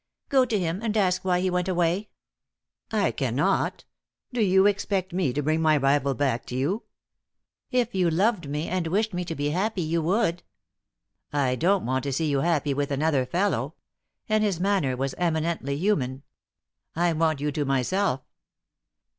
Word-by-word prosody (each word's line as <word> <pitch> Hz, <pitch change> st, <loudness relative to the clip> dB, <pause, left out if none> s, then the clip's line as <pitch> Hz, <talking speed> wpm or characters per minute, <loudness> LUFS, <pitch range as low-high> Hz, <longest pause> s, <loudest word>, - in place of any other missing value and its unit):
"Go 265 Hz, -2 st, +4 dB
to 225 Hz, -, 0 dB
him 175 Hz, -1 st, -1 dB
and 220 Hz, -2 st, -1 dB
ask 185 Hz, -3 st, +2 dB
why 180 Hz, -1 st, +1 dB
he 185 Hz, 0 st, 0 dB
went 180 Hz, 0 st, 0 dB
away." 180 Hz, +3 st, 0 dB, 0.8 s
"I -, -, +1 dB
cannot. -, -, 0 dB, 0.5 s
Do 245 Hz, -, 0 dB
you 190 Hz, -1 st, +4 dB
expect 195 Hz, -2 st, 0 dB
me 175 Hz, -7 st, +1 dB
to 145 Hz, +4 st, -2 dB
bring 155 Hz, +2 st, +1 dB
my 155 Hz, -1 st, +4 dB
rival 140 Hz, 0 st, +2 dB
back 130 Hz, -4 st, 0 dB
to 125 Hz, -, -5 dB
you?" 160 Hz, -, -1 dB, 0.8 s
"If 245 Hz, -2 st, 0 dB
you 185 Hz, -3 st, +2 dB
loved 180 Hz, -1 st, +1 dB
me 150 Hz, +3 st, -2 dB
and 180 Hz, -2 st, -1 dB
wished 210 Hz, +5 st, 0 dB
me 180 Hz, 0 st, -2 dB
to 165 Hz, -, -4 dB
be 145 Hz, 0 st, -1 dB
happy, 190 Hz, +2 st, -1 dB
you 165 Hz, +1 st, 0 dB
would." 175 Hz, +1 st, +1 dB, 0.9 s
"I 140 Hz, -3 st, +1 dB
don't 185 Hz, +7 st, +2 dB
want 130 Hz, +2 st, 0 dB
to 140 Hz, -, -1 dB
see 155 Hz, +2 st, 0 dB
you 140 Hz, -, +2 dB
happy 150 Hz, -2 st, +1 dB
with 140 Hz, +1 st, -1 dB
another 140 Hz, -2 st, +1 dB
fellow," 195 Hz, +7 st, 0 dB, 0.5 s
and 215 Hz, 0 st, +2 dB
his 195 Hz, -5 st, 0 dB
manner 180 Hz, -10 st, +1 dB
was 135 Hz, +1 st, -2 dB
eminently 160 Hz, -4 st, -1 dB
human. 140 Hz, -8 st, 0 dB, 0.7 s
"I 170 Hz, +1 st, +2 dB
want 160 Hz, -2 st, +1 dB
you 150 Hz, +1 st, -1 dB
to 150 Hz, 0 st, -1 dB
myself." 135 Hz, +3 st, 0 dB
170 Hz, 170 wpm, -26 LUFS, 145-190 Hz, 0.9 s, Go